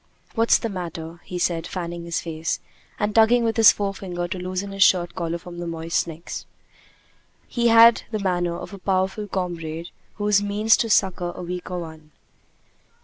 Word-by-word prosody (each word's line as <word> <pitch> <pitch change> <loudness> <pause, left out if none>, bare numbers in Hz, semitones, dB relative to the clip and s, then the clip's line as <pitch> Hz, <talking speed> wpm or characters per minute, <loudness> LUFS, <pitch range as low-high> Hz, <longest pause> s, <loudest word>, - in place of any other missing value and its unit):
"What's 230 0 +4
the - - -3
matter?" 170 -4 -6
he 180 - -5
said, 170 -2 0
fanning 170 -2 -5
his 170 0 -2
face, 165 -1 -3 0.4
and 210 0 -1
tugging 230 +2 +5
with 225 -1 0
his 225 -2 +8
forefinger 190 -3 -3
to 185 - -4
loosen 185 +2 -4
his 195 0 -6
shirt 175 -2 +4
collar 170 -1 -2
from 175 0 -10
his 175 - -4
moist 165 +1 -1
neck. 165 +1 -9 1.2
He 235 -1 +1
had 230 0 +7
the 220 - -2
manner 175 -3 -1
of 190 - -8
a 200 - -8
powerful 190 +2 -1
comrade 170 -3 -4 0.3
who 205 0 -2 0.2
means 210 +2 +3
to 230 - -1
succor 180 -3 +2
a - - -7
weaker 180 +1 -5
one. 160 -3 -8
180 Hz, 170 wpm, -23 LUFS, 170-205 Hz, 1.2 s, his